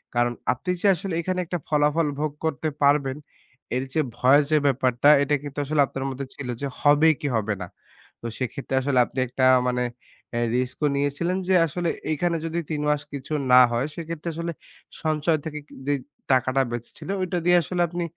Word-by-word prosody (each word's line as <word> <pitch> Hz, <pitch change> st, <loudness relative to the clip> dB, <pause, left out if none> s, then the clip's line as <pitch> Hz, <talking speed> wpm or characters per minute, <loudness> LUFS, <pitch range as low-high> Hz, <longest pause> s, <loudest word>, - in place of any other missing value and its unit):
কারণ 120 Hz, 0 st, +2 dB, 0.2 s
আপনি 150 Hz, +8 st, -8 dB
যে 205 Hz, -, +3 dB
আসলে 185 Hz, +2 st, -4 dB
এখানে 185 Hz, +1 st, -2 dB
একটা 175 Hz, 0 st, -3 dB
ফলাফল 150 Hz, +1 st, +2 dB
ভোগ 150 Hz, -1 st, -1 dB
করতে 160 Hz, 0 st, -1 dB, 0.2 s
পারবেন, 140 Hz, -1 st, +3 dB, 0.6 s
এর 130 Hz, -, 0 dB
যে 155 Hz, -, +2 dB, 0.2 s
ভয় 135 Hz, +4 st, +6 dB
যে 155 Hz, -, +4 dB
ব্যাপারটা 130 Hz, +1 st, +3 dB
এটা 145 Hz, +1 st, +1 dB
কিন্তু 145 Hz, 0 st, -8 dB
আসলে 150 Hz, 0 st, +2 dB
আপনার 135 Hz, 0 st, -5 dB
মধ্যে 135 Hz, +1 st, -5 dB
ছিল। 140 Hz, -, -7 dB
যে 140 Hz, -, -1 dB
হবে 145 Hz, +2 st, +5 dB
কি 145 Hz, -, -1 dB
হবে 110 Hz, -1 st, 0 dB
না? 90 Hz, -, -5 dB, 0.5 s
তো -, -, -10 dB
সেক্ষেত্রে 130 Hz, +1 st, -3 dB
আসলে 130 Hz, -1 st, +2 dB
আপনি 130 Hz, -, -6 dB
একটা 130 Hz, +2 st, 0 dB, 0.2 s
মানে 125 Hz, 0 st, 0 dB, 0.5 s
অ্যা 120 Hz, -, -1 dB, 0.2 s
রিস্ক 125 Hz, 0 st, -2 dB
ও -, -, +5 dB
নিয়েছিলেন 145 Hz, +6 st, 0 dB
যে 190 Hz, -, +3 dB
আসলে 170 Hz, +3 st, -2 dB, 0.2 s
এখানে 170 Hz, +2 st, 0 dB
যদি 165 Hz, +1 st, -2 dB
৩ 150 Hz, -1 st, -1 dB
মাস 150 Hz, -1 st, +1 dB
কিছু 140 Hz, +2 st, -5 dB, 0.2 s
না 125 Hz, -, +10 dB
হয় 120 Hz, +5 st, 0 dB
সেক্ষেত্রে 170 Hz, 0 st, -5 dB
আসলে 170 Hz, 0 st, -3 dB, 0.5 s
সঞ্চয় 155 Hz, 0 st, +1 dB
থেকে 150 Hz, -1 st, -5 dB
কি -, -, -17 dB
যে 145 Hz, -, +3 dB, 0.4 s
টাকাটা 130 Hz, +1 st, +3 dB
বেঁচেছিল, 120 Hz, +9 st, -7 dB
ওইটা 180 Hz, -1 st, -1 dB
দিয়ে 175 Hz, 0 st, +6 dB
আসলে 175 Hz, +3 st, -2 dB
আপনি 175 Hz, +1 st, -3 dB
145 Hz, 190 wpm, -24 LUFS, 130-165 Hz, 0.6 s, না